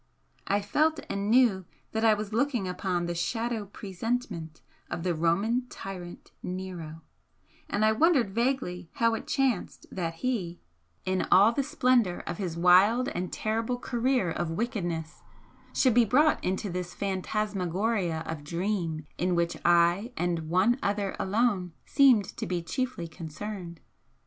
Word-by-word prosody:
I 200 Hz, +1 st, +2 dB
felt 310 Hz, +10 st, +2 dB
and 200 Hz, +1 st, -2 dB
knew 230 Hz, -6 st, +4 dB, 0.3 s
that 220 Hz, 0 st, -1 dB
I 220 Hz, -1 st, +6 dB
was 210 Hz, 0 st, -5 dB
looking 240 Hz, -4 st, +1 dB
upon 180 Hz, -1 st, -1 dB
the 175 Hz, -, -2 dB
'shadow 225 Hz, +5 st, -2 dB
presentment' 195 Hz, -5 st, -4 dB, 0.3 s
of 170 Hz, -, -4 dB
the 180 Hz, -1 st, +1 dB
Roman 195 Hz, +10 st, +1 dB
tyrant 180 Hz, -3 st, -8 dB
Nero; 175 Hz, -4 st, -6 dB, 0.7 s
and 210 Hz, +2 st, +1 dB
I 220 Hz, -, +5 dB
wondered 265 Hz, -, +3 dB
vaguely 230 Hz, -8 st, -1 dB
how 230 Hz, 0 st, +2 dB
it 225 Hz, -, -4 dB
chanced 265 Hz, -8 st, 0 dB
that 165 Hz, -3 st, -3 dB
he, 185 Hz, -6 st, -2 dB, 0.5 s
in 185 Hz, 0 st, 0 dB
all 205 Hz, +4 st, +7 dB
the 260 Hz, -, 0 dB
splendour 250 Hz, -9 st, +2 dB
of 170 Hz, -, -5 dB
his 175 Hz, -4 st, -3 dB
wild 195 Hz, +9 st, +5 dB
and 180 Hz, -5 st, -4 dB
terrible 225 Hz, +3 st, -1 dB
career 245 Hz, -6 st, 0 dB
of 175 Hz, 0 st, -2 dB
wickedness, 175 Hz, -5 st, -3 dB, 0.5 s
should 255 Hz, -3 st, +3 dB
be 240 Hz, +1 st, +6 dB
brought 275 Hz, +8 st, +3 dB
into 190 Hz, +1 st, -1 dB
this 180 Hz, 0 st, -4 dB
phantasmagoria 195 Hz, -2 st, -1 dB
of 160 Hz, -2 st, -5 dB
dream 170 Hz, -1 st, -2 dB
in 180 Hz, +1 st, +1 dB
which 170 Hz, 0 st, 0 dB
I 175 Hz, +7 st, +3 dB
and 170 Hz, -3 st, -1 dB
One 195 Hz, +9 st, +3 dB
Other 200 Hz, -1 st, -1 dB
alone 195 Hz, -4 st, +1 dB
seemed 255 Hz, -8 st, +5 dB
to -, -, -3 dB
be 175 Hz, -2 st, -2 dB
chiefly 255 Hz, -3 st, -3 dB
concerned. 170 Hz, +2 st, -7 dB
195 Hz, 145 wpm, -28 LUFS, 175-230 Hz, 0.7 s, all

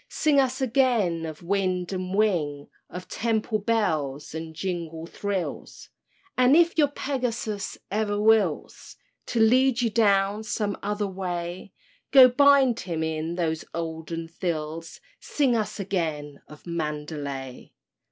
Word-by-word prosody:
Sing 300 Hz, -3 st, +2 dB
us 260 Hz, 0 st, +1 dB
again 230 Hz, -10 st, +1 dB
of 155 Hz, +1 st, -9 dB
wind 185 Hz, -1 st, -1 dB
and 185 Hz, 0 st, -3 dB
wing, 160 Hz, -9 st, 0 dB, 0.2 s
Of 180 Hz, 0 st, -8 dB
temple 220 Hz, 0 st, -1 dB
bells 160 Hz, -, -1 dB
and 160 Hz, 0 st, -6 dB
jungle 165 Hz, -2 st, -4 dB
thrills; 195 Hz, +1 st, -5 dB, 0.5 s
And 255 Hz, +2 st, +5 dB
if 340 Hz, +1 st, +4 dB
your 300 Hz, -3 st, +4 dB
Pegasus 245 Hz, -7 st, -3 dB, 0.2 s
e'er 205 Hz, -1 st, 0 dB
wills 210 Hz, -7 st, +1 dB, 0.3 s
To 235 Hz, -, -1 dB
lead 245 Hz, +2 st, +4 dB
you 230 Hz, -, +1 dB
down 205 Hz, -1 st, +2 dB
some 210 Hz, -2 st, -2 dB
other 205 Hz, +1 st, -2 dB
way, 180 Hz, -1 st, -5 dB, 0.4 s
Go 265 Hz, -2 st, +9 dB
bind 270 Hz, -2 st, +5 dB
him 165 Hz, -3 st, -3 dB
in 160 Hz, +2 st, -3 dB
his 160 Hz, -2 st, -1 dB
olden 165 Hz, 0 st, -4 dB
thills— 165 Hz, -1 st, -4 dB, 0.2 s
Sing 270 Hz, -5 st, +1 dB
us 215 Hz, -1 st, -2 dB
again 160 Hz, -7 st, -3 dB
of 150 Hz, -, -14 dB
Mandalay! 150 Hz, -5 st, -5 dB
190 Hz, 125 wpm, -25 LUFS, 165-225 Hz, 0.5 s, Go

